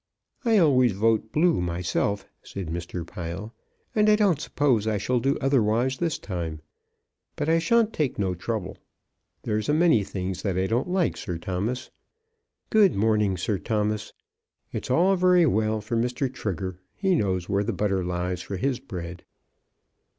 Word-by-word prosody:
"I 230 -3 +4
always 130 - +4
vote 110 +2 +1
Blue 165 - +3
myself," 90 +3 -1 0.2
said 95 -5 -7
Mr. 85 +1 -4
Pile, 90 +6 -6 0.4
"and 215 0 +4
I 210 - +7
don't 195 -8 +2
suppose 125 -10 +1
I 110 -1 +1
shall 125 +5 0
do 135 +4 +1
otherwise 130 -1 +2
this 165 -3 0
time. 85 -5 -5 0.8
But 150 - -2
I 165 +1 +4
shan't 225 +4 +2
take 150 -4 -1
no 95 -3 0
trouble. 95 +2 -4 0.6
There's 105 +5 -1
a 150 - +3
many 160 -10 +4
things 95 -1 -4
that 95 -3 -1
I 95 - +1
don't 115 - 0
like, 180 -2 +1
Sir 90 -4 -4
Thomas. 100 +9 -3 0.8
Good 210 -5 +5
morning, 105 -2 +2
Sir 95 +3 -1
Thomas. 105 -1 -1 0.6
It's - - -5
all 180 +9 +4
very 180 -1 +5
well 110 -4 +1
for 110 +3 -3
Mr. 125 +3 -1
Trigger. 95 -2 -4 0.2
He 190 -1 +1
knows 95 - 0
where 100 0 +1
the 110 - -1
butter 95 -2 0
lies 90 0 -2
for 100 - -5
his 130 +4 -1
bread." 90 -8 -7
110 Hz, 160 wpm, -25 LUFS, 95-145 Hz, 0.8 s, I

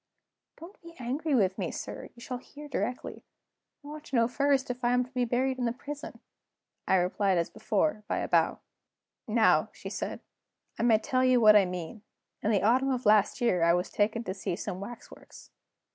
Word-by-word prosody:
"Don't 340 +5 -13
be 335 0 -13
angry 275 +5 -1
with 190 -5 +1
me, - - -1
sir; - - -7
you 235 - -15
shall 250 +1 -5
hear 295 +3 -12
directly. 250 -2 -4 0.6
I - - -12
want 305 0 -8
to 275 - -5
know 230 -1 +4
first 275 0 +1
if 250 +1 -8
I 240 0 +3
am 250 0 +3
to 250 - -19
be 250 -2 0
buried 255 +2 0
in 245 - 0
the 235 - +1
prison?" 285 +4 -8 0.7
I - - +4
replied 185 +1 +1
as 170 - -1
before, 220 +2 -1
by - - -1
a - - -2
bow. - - +2 0.7
"Now," 220 0 +3
she - - -8
said, - - -4 0.6
"I - - 0
may 230 -2 +5
tell 255 +3 0
you 255 -1 +4
what 215 -2 +7
I 205 -2 +6
mean. 180 +3 -6 0.4
In 210 - 0
the 205 -3 +2
autumn 255 +5 +3
of 255 -2 -2
last 210 +3 +4
year 185 -8 +2
I 170 +1 +4
was 180 +1 -2
taken 215 +3 0
to 185 - -4
see 190 -2 -3
some 180 0 -5
waxworks. 225 +5 -11
240 Hz, 205 wpm, -29 LUFS, 205-260 Hz, 0.7 s, what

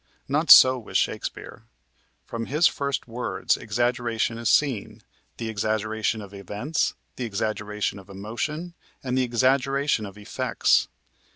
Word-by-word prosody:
Not 150 +4 0
so 130 0 +9
with 115 - -2
Shakespeare. - - -3 0.6
From 115 -1 -5
his 150 +5 +2
first 140 -3 -2
words, 120 +1 -1
exaggeration 115 0 -1
is 115 -1 0
seen: 135 -9 +1 0.3
the 115 - -4
exaggeration 110 0 -1
of 100 0 -12
events, 105 - -2 0.2
the 125 - -3
exaggeration 105 -1 -2
of 95 0 -16
emotion, 120 - -5 0.3
and 130 -1 -2
the 130 - +2
exaggeration 130 0 +1
of 100 +1 -12
effects. 105 - +1
115 Hz, 125 wpm, -25 LUFS, 105-130 Hz, 0.6 s, so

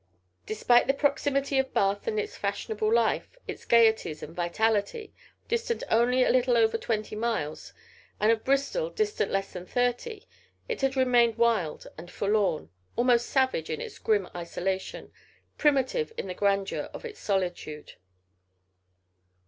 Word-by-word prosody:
Despite 240 +3 +3
the 270 - +2
proximity 280 -1 +1
of 265 0 -2
Bath 200 +1 +1
and 215 - 0
its - - -4
fashionable 210 +2 -2
life, 235 - +1
its - - -7
gaieties 220 -9 +3
and 160 - -9
vitality, 210 - -1 0.3
distant 465 0 -1
only 245 +3 +4
a - - +3
little 250 -1 +3
over 225 -1 +3
twenty 215 -2 -2
miles, 215 -10 -3 0.5
and 215 +2 +4
of 225 -1 0
Bristol 280 - 0
distant 430 -3 -1
less 195 0 -2
than 180 0 -8
thirty, 245 - -1 0.4
it 475 -9 -3
had 270 0 +1
remained 240 -3 +3
wild 225 -9 +1
and 175 +2 -10
forlorn, 200 -5 0 0.2
almost 240 0 +3
savage 260 - +1
in 155 - -3
its - - -8
grim 205 -4 +1
isolation, 185 +2 -4 0.5
primitive 295 - +2
in - - -3
the 185 - -4
grandeur 195 0 0
of - - -8
its 445 -2 -8
solitude. 180 -6 -3
230 Hz, 140 wpm, -27 LUFS, 200-265 Hz, 0.5 s, only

